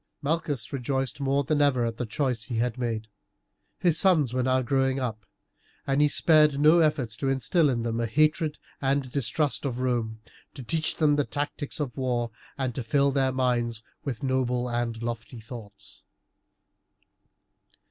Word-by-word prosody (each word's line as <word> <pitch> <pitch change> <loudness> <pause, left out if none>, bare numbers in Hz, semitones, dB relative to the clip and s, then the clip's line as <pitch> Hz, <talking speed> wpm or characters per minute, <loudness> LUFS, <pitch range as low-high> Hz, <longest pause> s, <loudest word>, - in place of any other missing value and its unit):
Malchus 145 -7 -2
rejoiced 135 +2 -2
more 140 +1 +1
than 145 +2 +1
ever 130 -4 +3
at 115 -1 -3
the 125 - -3
choice 120 -2 -1
he 120 -3 -4
had 120 0 0
made. 115 -3 -3 0.7
His 165 -3 +3
sons 155 -10 +3
were 130 - +1
now 130 +1 +2
growing 135 +1 +1
up, 110 -5 -4 0.6
and 135 +1 +2
he 150 - +6
spared 150 -1 +4
no 155 +3 +6
efforts 150 -8 +1
to 135 +2 -1
instill 140 +4 +2
in 120 -3 -1
them 115 0 -2
a 115 - 0
hatred 155 +4 +2 0.2
and 135 -1 0
distrust 140 +3 0
of 130 -3 -3
Rome, 120 -3 -1 0.4
to 135 - -7
teach 155 +6 0
them 150 -2 +3
the 145 - +3
tactics 145 +1 -4
of 140 -4 -3
war, 120 -3 -1 0.3
and 130 -3 -1
to 130 - -4
fill 140 +4 +2
their 135 -1 +1
minds 120 -3 0 0.2
with 130 -4 -4
noble 125 -2 0
and 120 -1 -2
lofty 115 +1 -5
thoughts. 110 -3 -11
130 Hz, 165 wpm, -27 LUFS, 120-145 Hz, 0.7 s, he